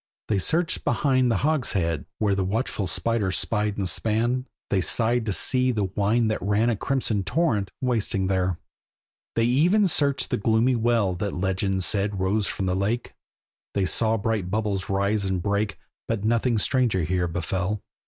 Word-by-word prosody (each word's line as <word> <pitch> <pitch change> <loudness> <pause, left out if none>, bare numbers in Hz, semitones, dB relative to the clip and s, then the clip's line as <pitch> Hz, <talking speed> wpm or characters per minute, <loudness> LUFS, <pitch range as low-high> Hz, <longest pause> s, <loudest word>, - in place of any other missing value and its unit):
They 105 -3 +2
searched 165 - +1
behind 130 -3 +2
the 115 - +2
hogshead, 95 - 0
where 105 -2 +1
The 95 -1 0
watchful 100 0 -2
spider 115 -3 0
spied 105 +1 -1
and 100 -2 -1
span; 120 +6 0 0.2
They 95 - +2
sighed 115 +4 +1
to - - +1
see 130 +6 +2
the 110 -4 -1
wine 110 +3 +2
that 110 - -1
ran 105 +5 +2
A - - 0
crimson 115 -4 -1
torrent, 105 - 0
wasting 110 -6 0
there. 95 -2 0 0.8
They 115 - +2
even 175 - +3
searched 140 -5 +1
the - - +1
gloomy 115 +4 +2
well 115 -4 +1
That 100 +3 -3
legend 95 +1 -1
said 100 +2 -1
rose 100 +2 0
from 95 - -3
the 90 -1 0
lake; 105 +5 -2 0.6
They 100 -2 +2
saw 110 +4 +2
bright 105 -4 -1
bubbles 100 -2 -2
rise 100 +2 +1
and 95 -1 -1
break, 100 +3 -1 0.3
But 115 -3 -2
nothing 115 +1 +2
stranger 115 -5 +1
here 90 +2 0
befell. 90 +4 -2
105 Hz, 165 wpm, -25 LUFS, 95-120 Hz, 0.8 s, even